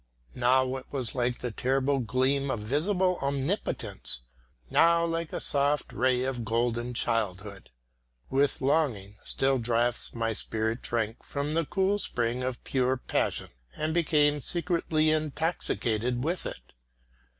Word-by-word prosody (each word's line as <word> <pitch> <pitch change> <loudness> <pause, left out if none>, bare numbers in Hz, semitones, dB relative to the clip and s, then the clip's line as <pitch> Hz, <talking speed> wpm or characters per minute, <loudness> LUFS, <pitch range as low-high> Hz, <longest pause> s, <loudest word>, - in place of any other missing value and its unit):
Now 130 +1 +2
it 130 - -11
was 130 -6 0
like 120 -1 0
the 125 - -4
terrible 135 +4 0
gleam 130 +3 +1
of 120 -5 -2
visible 180 - +1
omnipotence, 140 - -1 0.5
now 170 0 +4
like 165 -1 -3
a - - -3
soft 145 +1 +2
ray 125 0 +1
of 130 -2 -3
golden 120 +2 -1
childhood. 105 -4 -1 0.6
With 140 +1 +1
long, 130 -9 0
still 135 -1 +2
drafts 120 +1 +1
my 115 -1 -1
spirit 110 +2 -1
drank 115 -1 -2
from 145 +1 -3
the 165 0 +1
cool 195 +1 +1
spring 120 - -1
of 130 -1 -4
pure 130 0 +1
passion - - -1 0.3
and 155 +1 -2
became 150 -3 +3
secretly 165 -2 +1
intoxicated 130 -6 -1
with 170 +4 -1
it. - - -9
130 Hz, 130 wpm, -28 LUFS, 120-155 Hz, 0.6 s, now